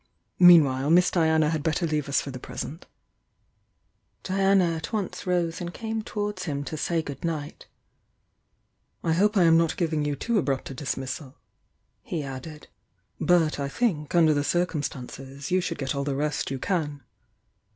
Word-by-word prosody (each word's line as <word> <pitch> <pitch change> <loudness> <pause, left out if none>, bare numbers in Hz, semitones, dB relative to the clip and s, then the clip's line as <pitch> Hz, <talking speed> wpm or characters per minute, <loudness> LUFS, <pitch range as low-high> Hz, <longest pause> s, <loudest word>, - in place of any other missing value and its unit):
Meanwhile, 150 -7 +6
Miss 180 +2 +5
Diana 160 -2 +3
had 160 -2 -1
bet 160 +2 0
ter 175 - 0
leave 150 -3 -1
us 140 - +3
for 140 - -6
the 130 - -7
present" 155 +5 -7 0.7
— - - -46
Diana 195 -2 +3
at 160 - -6
once 205 -4 -3
rose 175 -2 0
and 175 0 -4
came 225 -1 -3
towards 205 -3 -4
him 145 -4 -2
to 155 - -5
say 165 +1 -1
good 140 -3 -7
ni^t 155 -3 -4 0.7
— - - -47
"I 165 - +2
hope 205 +5 +2
I 185 - +6
am 165 -1 +6
not 165 -1 0
giving 160 -4 0
you 145 -1 -1
too 230 - 0
abrupt 135 -4 -2
a - - -5
dismissal," 135 +1 -5 0.8
ne 160 -3 -1
added, 140 +3 -8 0.5
"but 165 -4 +2
I 140 0 -2
think, 160 -6 -1
under 160 -3 +5
the 145 -1 0
circumstances, 140 -4 -3
you 185 0 +3
should - - -3
get 135 -1 -2
all 140 -1 -2
the 140 -1 -2
rest 150 +1 -1
you 135 - -3
can." 145 -3 -2
160 Hz, 175 wpm, -26 LUFS, 140-175 Hz, 0.8 s, Meanwhile